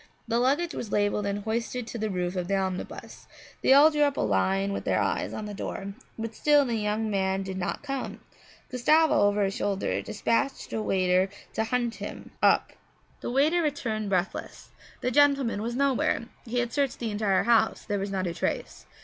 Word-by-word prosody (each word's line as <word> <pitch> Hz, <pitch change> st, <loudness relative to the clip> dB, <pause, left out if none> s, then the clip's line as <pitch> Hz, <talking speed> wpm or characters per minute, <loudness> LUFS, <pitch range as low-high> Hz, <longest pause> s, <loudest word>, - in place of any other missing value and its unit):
The 230 Hz, +1 st, +1 dB
luggage 290 Hz, +7 st, +1 dB
was 220 Hz, -, -5 dB
labelled 205 Hz, 0 st, +1 dB
and 200 Hz, 0 st, -2 dB
hoisted 230 Hz, +2 st, -2 dB
to 235 Hz, -, -6 dB
the 215 Hz, 0 st, -1 dB
roof 180 Hz, -1 st, -2 dB
of 180 Hz, -1 st, -2 dB
the 200 Hz, -, +1 dB
omnibus; 190 Hz, -1 st, -5 dB, 0.3 s
they -, -, +3 dB
all 290 Hz, +4 st, +8 dB
drew 300 Hz, -1 st, 0 dB
up 285 Hz, -1 st, +3 dB
in -, -, +1 dB
a -, -, +2 dB
line 190 Hz, -, +1 dB
with -, -, -3 dB
their -, -, +1 dB
eyes -, -, -1 dB
on 215 Hz, -, -5 dB
the 210 Hz, -, -6 dB
door; 200 Hz, 0 st, -5 dB, 0.2 s
but 225 Hz, 0 st, -4 dB
still 295 Hz, +3 st, +4 dB
the 240 Hz, -, -2 dB
young 215 Hz, 0 st, -1 dB
man 190 Hz, -1 st, 0 dB
did 190 Hz, 0 st, -5 dB
not 190 Hz, +8 st, -3 dB
come. 275 Hz, -2 st, -4 dB, 0.5 s
Gustavo, 305 Hz, +6 st, +4 dB
over 205 Hz, 0 st, +3 dB
his 195 Hz, 0 st, 0 dB
shoulder, 200 Hz, -1 st, -1 dB
dispatched 230 Hz, +5 st, -1 dB
a 220 Hz, -, -1 dB
waiter 185 Hz, -2 st, +2 dB, 0.2 s
to 220 Hz, -, 0 dB
hunt 240 Hz, 0 st, 0 dB
him -, -, -7 dB
up. -, -, +3 dB, 0.5 s
The -, -, -5 dB
waiter 295 Hz, +7 st, +3 dB
returned 225 Hz, -9 st, -2 dB
breathless. 185 Hz, 0 st, -3 dB, 0.3 s
The 250 Hz, -, 0 dB
gentleman 275 Hz, -6 st, +3 dB
was 235 Hz, +2 st, -3 dB
nowhere. 270 Hz, -3 st, +1 dB, 0.2 s
He 240 Hz, +1 st, -3 dB
had 240 Hz, -1 st, 0 dB
searched 280 Hz, -3 st, 0 dB
the 230 Hz, -2 st, -3 dB
entire 205 Hz, -2 st, +1 dB
house; 235 Hz, -1 st, +2 dB
there 205 Hz, -1 st, -1 dB
was 200 Hz, +1 st, -3 dB
not 190 Hz, -1 st, -2 dB
a 170 Hz, -, -2 dB
trace. -, -, -3 dB
220 Hz, 200 wpm, -27 LUFS, 195-255 Hz, 0.5 s, all